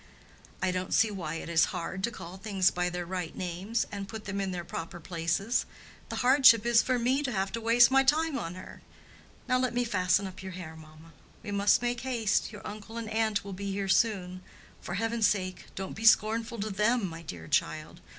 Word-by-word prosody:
"I 185 - +2
don't 185 0 -2
see 220 -1 +4
why 165 -6 -4
it - - -6
is 165 -1 +4
hard 185 +1 -5
to - - -2
call 175 -6 -9
things 195 -2 +1
by 180 0 -1
their 175 0 -4
right 180 -2 -4
names, 185 +6 -2
and 200 -1 -5
put 220 +1 -8
them 195 0 -3
in 195 - -2
their 180 -2 -4
proper 170 +1 -6
places. 170 +7 -1 0.4
The - - -4
hardship 255 -4 +7
is 235 -1 +5
for 255 -1 0
me 255 +4 +1
to 270 -3 -2
have 195 -2 -1
to 230 - -4
waste 235 +2 +5
my 270 0 +5
time 305 +3 +2
on 170 +1 -5
her. 185 - -11 0.7
Now 255 0 +2
let 255 -1 -1
me 245 - +2
fasten 185 -3 +1
up 190 -1 -8
your 190 -1 -7
hair, 170 -3 -8
mamma." 155 +1 -15 0.3
"We 205 - -6
must 200 +3 +3
make 240 -1 -1
haste; 235 -6 0
your 210 -2 -11
uncle 215 +2 -8
and 225 -2 -5
aunt 220 -2 +1
will 200 - -6
be 200 +1 -4
here 195 0 -2
soon. 190 -4 +1 0.4
For 175 - -5
heaven's 225 0 +1
sake, 185 -3 -2
don't 190 -1 -5
be 225 - -6
scornful 225 +1 +4
to 215 +1 -3
them, 210 +3 +2
my 165 -1 -8
dear 85 - -8
child! - - -1
200 Hz, 215 wpm, -29 LUFS, 180-230 Hz, 0.7 s, hardship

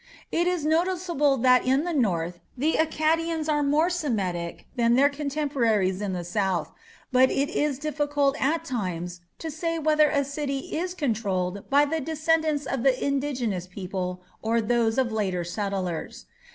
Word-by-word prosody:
It 345 +1 +1
is 355 -4 0
noticeable 335 -3 +2
that 250 0 +5
in 265 +3 +2
the 350 0 -2
north 175 - 0 0.2
the 305 +6 +1
Akkadians 320 0 +1
are 300 -1 +2
more 295 +4 +3
Semitic 195 - -2
than 235 -1 +3
their 280 +3 +5
contemporaries 270 -10 0
in 200 -2 -2
the 175 -1 -3
south, 190 0 -1 0.4
but 260 0 +5
it 280 +2 0
is 295 -4 0
difficult 290 -1 0
at 315 +4 +1
times 180 -7 -4 0.2
to 320 - -5
say 330 +2 -2
whether 305 -1 +4
a 285 -1 +1
city 280 -1 -3
is 355 +3 -2
controlled 200 - -2
by 285 +1 +5
the 315 +2 -2
descendants 315 -1 0
of 270 -3 -2
the 260 0 +3
indigenous 260 -10 -1
people 180 -1 -5 0.2
or 225 +1 +1
those 230 +1 +1
of 255 -3 +1
later 190 -5 -1
settlers. 185 -2 -4
270 Hz, 155 wpm, -26 LUFS, 205-305 Hz, 0.4 s, that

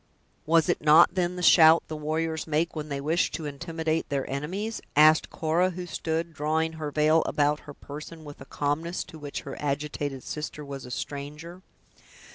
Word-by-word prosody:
"Was 165 0 +4
it - - 0
not, 155 +3 +6
then, 180 -1 0
the 180 - -5
shout 165 -1 +7
the 155 - -5
warriors 160 +1 -2
make 160 +3 0
when 155 -1 -5
they 140 -1 -3
wish 160 +5 +1
to 160 - -4
intimidate 160 +2 -3
their 140 -2 -2
enemies?" 185 +11 -4
asked 155 +1 +6
Cora 165 +3 +1
who 180 0 -6
stood 165 -1 -3
drawing 160 +2 0
her 155 -2 -4
veil 155 +2 +3
about 150 0 +1
her - - -7
person, 150 +3 -9
with 145 -1 -11
a - - -9
calmness 150 +6 -2
to 160 - -13
which 145 -1 -6
her 135 - -7
agitated 145 -1 -3
sister 150 -1 -6
was 140 -2 -7
a - - -10
stranger. 150 +7 -6
155 Hz, 180 wpm, -27 LUFS, 145-165 Hz, -, shout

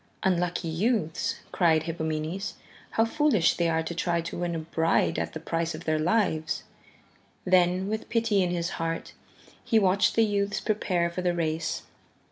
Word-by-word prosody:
"Unlucky 180 -2 0
youths," 205 +3 0 0.2
cried 160 -3 +3
Hippomenes, 160 +3 -3 0.3
"how 225 - +2
foolish 255 - +3
they 170 -1 +1
are 160 0 +1
to 160 - -4
try 170 0 0
to 170 +1 -5
win 175 -1 -1
a - - -1
bride 165 +1 +1
at - - -3
the 160 - -5
price 165 +1 -2
of - - -8
their 155 -1 +1
lives." 160 -3 +1 0.8
Then, 180 0 +3
with 215 +1 -3
pity 225 -4 +2
in 180 - +1
his 170 -1 -1
heart, 165 0 -3 0.5
he 225 - +2
watched 200 -1 +3
the 225 - +5
youths 205 0 0
prepare 180 -6 0
for 180 - -3
the 175 -1 +1
race. 160 -1 -1
175 Hz, 165 wpm, -27 LUFS, 165-200 Hz, 0.8 s, the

